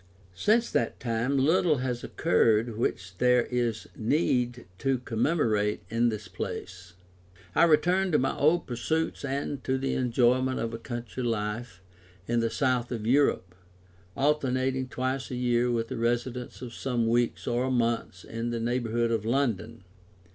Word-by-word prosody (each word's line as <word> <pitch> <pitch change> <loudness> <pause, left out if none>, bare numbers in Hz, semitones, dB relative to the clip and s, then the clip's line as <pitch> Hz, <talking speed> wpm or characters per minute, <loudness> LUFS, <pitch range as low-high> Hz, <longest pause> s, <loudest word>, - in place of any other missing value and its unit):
Since 225 - +2
that 115 - 0
time 120 +3 0
little 155 +3 +3
has 125 -1 -3
occurred 110 +4 +2
which 95 -4 -2
there 125 -1 +4
is 120 -3 -1
need 120 -1 0
to 135 -1 +1
commemorate 115 -4 0
in 120 +1 +3
this 105 -3 -5
place. 90 0 -6 0.6
I - - +5
returned 180 +3 +3
to - - +6
my 135 - 0
old 160 +4 +3
pursuits 155 +8 -2
and 140 0 -3
to 130 0 0
the 135 0 -1
enjoyment 130 +1 +2
of 115 0 -3
a 115 - -5
country 120 +1 -6
life 105 -3 -3 0.4
in 120 0 +1
the 115 0 +1
south 125 +1 0
of 115 -3 -3
Europe, 120 -8 +2 0.6
alternating 130 -2 +1
twice 130 +1 -2
a 125 - -4
year 125 0 +1
with 115 -1 -1
a - - -3
residence 120 +2 -2
of 120 -2 -7
some 120 -3 -1
weeks 120 +1 +1
or 125 +2 0
months 115 -6 -1
in 115 +1 -4
the 120 -1 -2
neighbourhood 120 0 0
of 115 -3 0
London. 115 -3 -1
120 Hz, 150 wpm, -28 LUFS, 115-130 Hz, 0.6 s, to